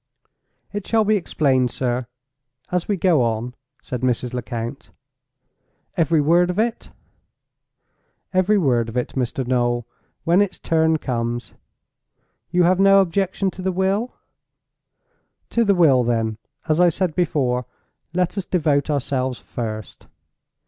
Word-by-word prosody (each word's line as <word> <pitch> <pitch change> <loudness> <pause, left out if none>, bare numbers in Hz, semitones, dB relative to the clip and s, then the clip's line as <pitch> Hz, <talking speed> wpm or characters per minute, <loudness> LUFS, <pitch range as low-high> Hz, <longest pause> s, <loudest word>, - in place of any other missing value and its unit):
"It 205 -1 -4
shall 225 -1 +3
be 215 +1 +3
explained, 135 -9 +1
sir, 125 0 -2 0.6
as 180 -1 -1
we 205 - 0
go 170 -5 +3
on," 115 +1 -1 0.3
said 125 -1 -5
Mrs. 125 -1 -1
Lecount. 120 +2 -5 1.1
"Every 165 -3 +2
word 170 +4 +3
of 180 - -2
it?" 225 +1 -1 1.4
"Every 185 +3 +3
word 120 - +1
of 115 - -5
it, 125 - -1
Mr. 130 0 -2
Noel, 120 -1 0 0.4
when 170 +4 +4
its 205 -2 -1
turn 160 -1 +2
comes. 120 -4 -3 1.0
You 180 +1 +3
have 180 +2 +3
no 195 0 +6
objection 190 +1 0
to 185 - -9
the 190 +1 0
will? 195 +6 -1 1.4
To 235 - +2
the 200 -3 +3
will, 140 -8 +5
then, 115 -2 -1 0.3
as 155 +2 +2
I 175 - +6
said 175 0 -1
before, 130 -8 0 0.4
let 180 +3 0
us 190 - -4
devote 150 -5 +1
ourselves 130 -3 -1
first. 110 -3 -7
155 Hz, 135 wpm, -21 LUFS, 125-185 Hz, 1.4 s, no